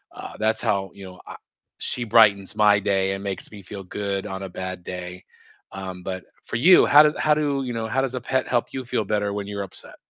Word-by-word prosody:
uh, -, -, -8 dB
that's 110 Hz, +1 st, +1 dB
how, 100 Hz, -4 st, 0 dB
you 100 Hz, -1 st, -11 dB
know, 90 Hz, -1 st, -12 dB
I -, -, -8 dB, 0.5 s
she 125 Hz, -, -1 dB
brightens 105 Hz, -4 st, +4 dB
my 105 Hz, -1 st, +5 dB
day 95 Hz, -1 st, +1 dB
and 95 Hz, 0 st, -6 dB
makes 95 Hz, -2 st, -5 dB
me 105 Hz, -2 st, -10 dB
feel 100 Hz, +1 st, -9 dB
good 100 Hz, +1 st, -3 dB
on 95 Hz, -2 st, -5 dB
a 95 Hz, -, -6 dB
bad 95 Hz, 0 st, -6 dB
day, 90 Hz, 0 st, -7 dB, 0.5 s
um, 95 Hz, -2 st, -7 dB
but 95 Hz, 0 st, -5 dB, 0.2 s
for -, -, -5 dB
you, 170 Hz, +11 st, +7 dB
how 145 Hz, +1 st, +8 dB
does 150 Hz, 0 st, +2 dB
how 155 Hz, -, +3 dB
do, 145 Hz, -2 st, 0 dB
you 125 Hz, -2 st, -4 dB
know, 115 Hz, -1 st, -3 dB
how 135 Hz, +4 st, 0 dB
does 130 Hz, -1 st, -2 dB
a 125 Hz, -, -3 dB
pet 130 Hz, +1 st, -1 dB
help 120 Hz, -2 st, 0 dB
you 130 Hz, -, -5 dB
feel 115 Hz, -2 st, -1 dB
better 105 Hz, 0 st, -1 dB
when 100 Hz, -1 st, -4 dB
you're 100 Hz, -1 st, -4 dB
upset? 95 Hz, -, -8 dB
100 Hz, 240 wpm, -23 LUFS, 95-120 Hz, 0.5 s, how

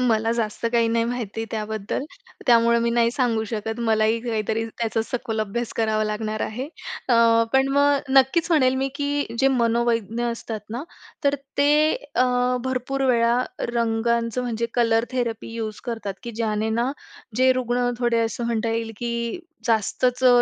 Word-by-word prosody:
मला 225 Hz, -2 st, +2 dB
जास्त 230 Hz, -1 st, -3 dB
काही 230 Hz, -1 st, +3 dB
नाही 230 Hz, 0 st, +1 dB
माहिती 225 Hz, -2 st, -3 dB
त्याबद्दल. 215 Hz, +3 st, -3 dB, 0.4 s
त्यामुळं 235 Hz, -1 st, +5 dB
मी 235 Hz, -, +1 dB
नाही 235 Hz, 0 st, +3 dB
सांगू 240 Hz, -4 st, 0 dB
शकत. 220 Hz, +1 st, -4 dB
मलाही 220 Hz, +1 st, +2 dB
काहीतरी 220 Hz, 0 st, -1 dB
त्याचा 225 Hz, 0 st, -2 dB
सखोल 225 Hz, -3 st, -3 dB
अभ्यास 220 Hz, +3 st, -3 dB
करावा 215 Hz, -1 st, +1 dB
लागणार 215 Hz, 0 st, -3 dB
आहे. 250 Hz, +6 st, -3 dB, 0.4 s
अ, 240 Hz, -, +4 dB, 0.4 s
पण 265 Hz, 0 st, +4 dB
मग 285 Hz, 0 st, +3 dB, 0.2 s
नक्कीचं 320 Hz, +6 st, +4 dB
म्हणेल 260 Hz, -3 st, +4 dB
मी 270 Hz, -, 0 dB
की 285 Hz, 0 st, -1 dB
जे 270 Hz, +2 st, +4 dB
मनोवैज्ञानिक 230 Hz, -1 st, +1 dB
असतात 230 Hz, -2 st, -4 dB
ना 240 Hz, +5 st, -4 dB, 0.4 s
तर 280 Hz, 0 st, +4 dB, 0.2 s
ते 300 Hz, +2 st, +4 dB, 0.2 s
अ, 255 Hz, -, +4 dB, 0.4 s
भरपूर 260 Hz, +1 st, -1 dB
वेळा 235 Hz, 0 st, +3 dB, 0.3 s
रंगांचं 235 Hz, +1 st, 0 dB
म्हणजे 235 Hz, -1 st, -2 dB
कलर 230 Hz, -1 st, +3 dB
थेरपी 230 Hz, -3 st, -2 dB
यूज 220 Hz, -2 st, -4 dB
करतात, 225 Hz, -5 st, -4 dB
की 235 Hz, -, -5 dB
ज्याने 220 Hz, -1 st, -1 dB
ना 245 Hz, +3 st, +1 dB, 0.5 s
जे 260 Hz, 0 st, +5 dB
रुग्ण 245 Hz, -1 st, 0 dB
थोडे 240 Hz, -1 st, +2 dB
असं 230 Hz, +1 st, -3 dB
म्हणता 230 Hz, -1 st, 0 dB
येईल 225 Hz, 0 st, -2 dB
की 235 Hz, -1 st, -2 dB, 0.5 s
जास्तचं 245 Hz, +3 st, +3 dB
235 Hz, 155 wpm, -23 LUFS, 225-250 Hz, 0.5 s, त्यामुळं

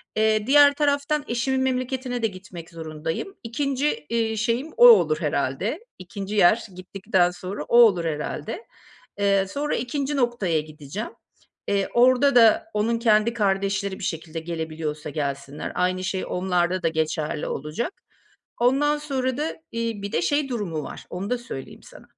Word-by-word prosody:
Eee, 215 Hz, 0 st, +2 dB
diğer 285 Hz, +1 st, +7 dB
taraftan 290 Hz, +1 st, 0 dB
eşimin 260 Hz, +3 st, 0 dB
memleketine 255 Hz, -1 st, -2 dB
de 225 Hz, -, +2 dB
gitmek 185 Hz, -4 st, -10 dB
zorundayım. 160 Hz, -, -5 dB
2'nci, 270 Hz, -, -1 dB
iii, 225 Hz, -1 st, 0 dB
şeyim 235 Hz, +8 st, -1 dB
o 485 Hz, -, +9 dB
olur 155 Hz, -, +6 dB
herhâlde. 150 Hz, -, -1 dB, 0.2 s
2'nci 195 Hz, +3 st, -6 dB
yer 210 Hz, +4 st, +4 dB
gittikten 185 Hz, 0 st, 0 dB
sonra 180 Hz, -1 st, -6 dB
o 235 Hz, -, +2 dB
olur 195 Hz, -8 st, +6 dB
herhâlde. 155 Hz, -, -4 dB, 0.5 s
Eee, 195 Hz, -1 st, +2 dB
sonra 290 Hz, +7 st, -2 dB
2'nci 275 Hz, +4 st, -2 dB
noktaya 240 Hz, -, +1 dB
gideceğim. 155 Hz, +7 st, -7 dB, 0.6 s
Eee, 200 Hz, -1 st, 0 dB
orada 255 Hz, +3 st, +4 dB
da 230 Hz, -3 st, +6 dB
onun 225 Hz, +2 st, 0 dB
kendi 225 Hz, 0 st, +3 dB
kardeşleri 195 Hz, -2 st, 0 dB
bir -, -, -8 dB
şekilde 165 Hz, 0 st, -4 dB
gelebiliyorsa 160 Hz, -2 st, -5 dB
gelsinler, 140 Hz, -1 st, -4 dB
aynı 185 Hz, +1 st, 0 dB
şey 185 Hz, 0 st, -2 dB
onlarda 180 Hz, 0 st, 0 dB
da -, -, +3 dB
geçerli 155 Hz, -1 st, -2 dB
olacak. 155 Hz, -, -3 dB, 0.7 s
Ondan 285 Hz, +5 st, +3 dB
sonra 265 Hz, -4 st, -2 dB
da, 305 Hz, +2 st, -2 dB, 0.2 s
iii, 230 Hz, -3 st, -3 dB
bir 200 Hz, -, -5 dB
de -, -, +1 dB
şey 285 Hz, -, +1 dB
durumu 200 Hz, -, -3 dB
var, -, -, -9 dB
onu 190 Hz, +3 st, -5 dB
da 250 Hz, -, +1 dB
söyleyeyim 240 Hz, -, -9 dB
sana. -, -, -15 dB
210 Hz, 150 wpm, -24 LUFS, 170-250 Hz, 0.7 s, o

